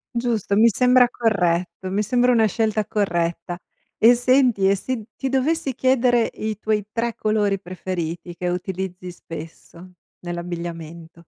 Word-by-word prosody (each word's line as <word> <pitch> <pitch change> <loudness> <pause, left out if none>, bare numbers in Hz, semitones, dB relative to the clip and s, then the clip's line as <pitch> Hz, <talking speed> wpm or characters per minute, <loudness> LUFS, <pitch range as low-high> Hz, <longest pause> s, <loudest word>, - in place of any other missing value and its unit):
Giusto, 230 -4 0
mi 230 +2 +6
sembra 250 +2 +4
corretto. 185 -6 0
Mi 205 +2 +1
sembra 245 +3 +2
una 225 -2 +4
scelta 215 0 0
corretta. 175 -4 -1 0.4
E 240 +2 +7
senti, 245 -5 +3
e 200 - +4
se 235 +2 -4
ti 270 - -3
dovessi 270 0 0
chiedere 250 -3 +2
i 215 -1 -3
tuoi 215 -2 -1
3 230 -1 -1
colori 205 -2 0
preferiti 175 -2 -5
che 180 +1 -4
utilizzi 180 0 -4
spesso 165 +2 -11 0.3
nell'abbigliamento? 170 -2 -7
205 Hz, 135 wpm, -22 LUFS, 175-235 Hz, 0.4 s, E